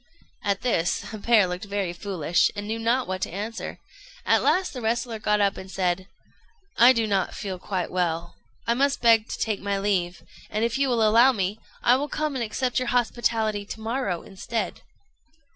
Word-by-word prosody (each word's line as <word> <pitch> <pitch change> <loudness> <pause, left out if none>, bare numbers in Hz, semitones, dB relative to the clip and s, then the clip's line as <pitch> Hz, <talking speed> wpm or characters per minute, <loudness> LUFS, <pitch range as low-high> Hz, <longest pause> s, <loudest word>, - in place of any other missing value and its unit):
At 200 -1 0
this 175 -9 +1
the 215 - -8
pair 220 -2 +4
looked 180 +2 -4
very 200 -3 -2
foolish, 175 -3 +1
and 205 0 -5
knew 225 +1 -2
not 235 +3 +1
what 185 0 -3
to - - -1
answer; 210 +6 -5 0.5
at - - +4
last 370 0 +2
the 250 - -6
wrestler 230 0 -1
got 210 0 +1
up 200 -1 +2
and 190 - -8
said 185 0 -1 0.7
"I 240 +2 +8
do 230 -3 +1
not 195 -4 0
feel 190 -3 -5
quite 185 -1 -3
well. 170 -1 -1 0.3
I 235 - +2
must 275 +2 +1
beg 225 -2 +5
to - - -4
take 215 -3 -1
my 200 0 -1
leave; 190 -3 -1 0.3
and, 215 +2 0
if 235 +3 -1
you 275 -1 +2
will 230 -3 +3
allow 235 +5 +6
me, 200 0 -2 0.2
I 245 +1 +5
will 290 +2 -3
come 305 0 -2
and 255 -3 -2
accept 250 +3 -1
your 255 - -3
hospitality 225 -3 0
to 205 - -8
morrow 220 -6 -2
instead." 225 +4 -4
215 Hz, 195 wpm, -25 LUFS, 190-235 Hz, 0.7 s, I